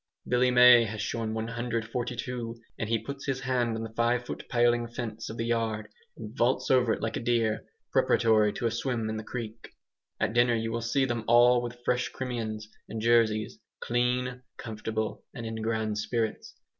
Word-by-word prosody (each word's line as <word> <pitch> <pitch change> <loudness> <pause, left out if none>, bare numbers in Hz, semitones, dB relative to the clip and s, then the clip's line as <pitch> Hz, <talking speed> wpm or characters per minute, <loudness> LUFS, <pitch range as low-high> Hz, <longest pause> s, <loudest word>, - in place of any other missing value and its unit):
Billy 125 +1 +3
May 125 -1 +8
has 110 0 -5
shorn 110 +1 -2
142, 115 +1 -3 0.2
and 110 - -2
he 115 - +3
puts 140 +3 -7
his 135 -1 -1
hand 125 -3 0
on 115 - -4
the 110 0 -7
five 120 +2 +1
foot - - -6
paling 120 -1 +3
fence 115 -2 -5
of 110 - -7
the 115 - -2
yard 110 -2 -1 0.3
and 110 0 -8
vaults 125 +1 +1
over 125 -3 +4
it - - -5
like 115 - -1
a - - -2
deer, 115 -2 +1 0.3
preparatory 110 -2 +4
to - - -4
a 115 - +2
swim 115 -1 -2
in 110 - -3
the 110 - -5
creek. 115 -1 -7 0.4
At - - 0
dinner 120 0 +4
you 115 0 -2
will 115 +1 -2
see 135 +4 +1
them 120 -3 -2
all 120 +1 +6
with 120 0 -7
fresh 125 0 +1
Crimeans 110 -4 -4 0.2
and 110 - -4
Jerseys, 110 -2 +2 0.2
clean, 125 +1 0 0.2
comfortable, 110 -1 -4
and 115 - -6
in 110 0 -4
grand 110 -1 -1
spirits. 110 +1 -2
115 Hz, 180 wpm, -28 LUFS, 110-125 Hz, 0.4 s, May